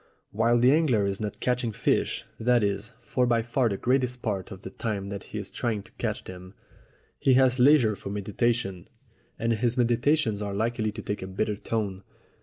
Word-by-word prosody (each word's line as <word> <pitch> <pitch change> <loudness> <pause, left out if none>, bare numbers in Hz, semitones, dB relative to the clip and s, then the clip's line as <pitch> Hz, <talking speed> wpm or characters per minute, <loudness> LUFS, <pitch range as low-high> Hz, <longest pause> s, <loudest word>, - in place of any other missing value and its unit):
While 115 +3 +3
the 125 +2 +5
angler 140 -10 +3
is 100 +1 -2
not 105 -1 -4
catching 125 -2 0
fish - - 0
that 120 0 +3
is, 100 +3 -2
for 125 -1 0
by 115 -1 +2
far 120 +1 +1
the 100 - -2
greater 130 +3 +2
part 100 -5 -3
of 95 -2 -10
the 95 - -7
time 100 -3 -3
that 100 -1 -6
he - - -7
is 100 -2 -5
trying 110 -5 -2
to - - -17
catch - - -2
them 90 +1 -10 0.6
he 130 - +4
has 130 -1 +4
leisure 125 -5 +5
for 100 - -8
meditation, 105 -1 -1 0.5
and 115 0 +1
his 120 +2 0
meditations 120 -1 +2
are 100 -1 -3
likely 110 0 0
to 110 0 -8
take 105 - -3
a 95 - -5
bitter 105 +3 -1
tone. 100 -2 -3
110 Hz, 195 wpm, -27 LUFS, 100-120 Hz, 0.6 s, the